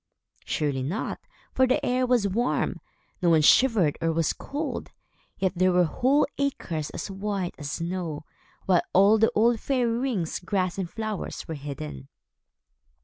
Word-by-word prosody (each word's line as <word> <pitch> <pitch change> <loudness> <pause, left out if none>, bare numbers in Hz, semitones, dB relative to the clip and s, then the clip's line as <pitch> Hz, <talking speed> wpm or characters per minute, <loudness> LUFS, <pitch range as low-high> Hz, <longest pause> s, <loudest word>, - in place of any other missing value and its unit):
Surely 145 -4 -1
not, 160 - -3 0.3
for 260 - +4
the 255 - +1
air 255 +1 +1
was 245 -5 +3
warm. 235 +6 -1 0.4
No 175 - +3
one 160 -2 +4
shivered, 205 - +4
or 165 0 +1
was 165 -1 +1
cold. 295 +2 -5 0.5
Yet 190 -1 +1
there 185 +1 +3
were 180 0 +4
whole 260 - +2
acres 170 - -2
as - - -6
white 195 -2 -3
as 145 -1 -5
snow, 170 -3 -4 0.4
while 180 -2 +4
all 200 +4 +6
the 225 - +5
old 230 +1 +3
fairy 250 -2 0
rings, 235 -10 -1
grass 185 0 -1
and 180 -3 -3
flowers 215 0 -5
were 160 - -4
hidden. 75 - -7
185 Hz, 150 wpm, -26 LUFS, 165-230 Hz, 0.5 s, all